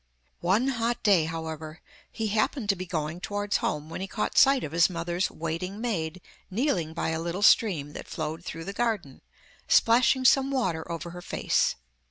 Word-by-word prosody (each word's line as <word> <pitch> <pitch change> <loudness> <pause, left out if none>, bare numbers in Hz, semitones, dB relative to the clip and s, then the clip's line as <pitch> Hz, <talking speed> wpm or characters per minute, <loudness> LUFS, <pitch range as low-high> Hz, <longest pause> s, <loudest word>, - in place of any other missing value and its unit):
One 205 +10 +2
hot 240 -1 -1
day, 195 -7 +4
however, 160 -1 -6 0.3
he 220 -2 -2
happened 215 +2 0
to 200 - +4
be 185 0 -6
going 160 -1 -3
towards 205 +1 -1
home 150 0 -2
when 165 - -6
he 190 - -3
caught 210 +2 -3
sight 270 -1 +5
of 145 - -4
his 170 +2 +4
mother's 175 +1 -1
waiting 165 +5 -4
maid 185 -7 -3 0.3
kneeling 185 - -1
by - - -1
a 160 0 -2
little 175 +4 -3
stream 165 -10 +4
that - - -8
flowed 160 +1 -4
through 165 -1 -6
the 200 - -5
garden, 210 - -2 0.5
splashing 250 +3 +4
some 270 +1 +5
water 180 -12 -1
over 170 +1 -5
her 175 0 -8
face. - - +1
180 Hz, 180 wpm, -27 LUFS, 160-220 Hz, 0.5 s, sight